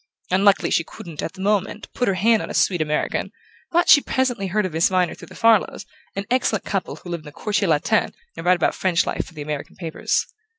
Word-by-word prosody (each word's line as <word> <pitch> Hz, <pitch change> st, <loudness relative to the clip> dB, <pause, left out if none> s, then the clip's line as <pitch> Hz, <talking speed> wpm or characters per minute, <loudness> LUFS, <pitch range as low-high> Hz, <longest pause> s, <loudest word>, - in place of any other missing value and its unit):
Unluckily 195 Hz, +1 st, +3 dB
she 165 Hz, -, +2 dB
couldn't, 165 Hz, -1 st, -9 dB
at -, -, -4 dB
the 190 Hz, -, -10 dB
moment, 205 Hz, +1 st, -1 dB
put 245 Hz, -, -1 dB
her 195 Hz, -, +2 dB
hand 220 Hz, +4 st, +3 dB
on -, -, -6 dB
a -, -, -5 dB
sweet 180 Hz, -4 st, +2 dB
American; 150 Hz, -1 st, -1 dB, 0.4 s
but 345 Hz, +1 st, +2 dB
she 290 Hz, -, +8 dB
presently 250 Hz, -8 st, -1 dB
heard 210 Hz, +2 st, 0 dB
of 185 Hz, -, -4 dB
Miss 160 Hz, +1 st, +3 dB
Viner 185 Hz, -2 st, +1 dB
through -, -, -12 dB
the -, -, -14 dB
Farlows, 225 Hz, -3 st, +2 dB, 0.3 s
an 200 Hz, 0 st, -3 dB
excellent 255 Hz, 0 st, +1 dB
couple 195 Hz, -2 st, -2 dB
who 180 Hz, -, -12 dB
live 170 Hz, -1 st, -3 dB
in 155 Hz, -, -18 dB
the 150 Hz, -, -9 dB
Quartier 205 Hz, +5 st, -1 dB
Latin 150 Hz, -1 st, +2 dB, 0.2 s
and -, -, -7 dB
write 180 Hz, +1 st, +4 dB
about 175 Hz, -, +1 dB
French 185 Hz, -2 st, +1 dB
life -, -, -2 dB
for 170 Hz, -, -15 dB
the 150 Hz, -, -6 dB
American 150 Hz, -1 st, -5 dB
papers. 165 Hz, -3 st, -1 dB
190 Hz, 230 wpm, -22 LUFS, 170-210 Hz, 0.4 s, she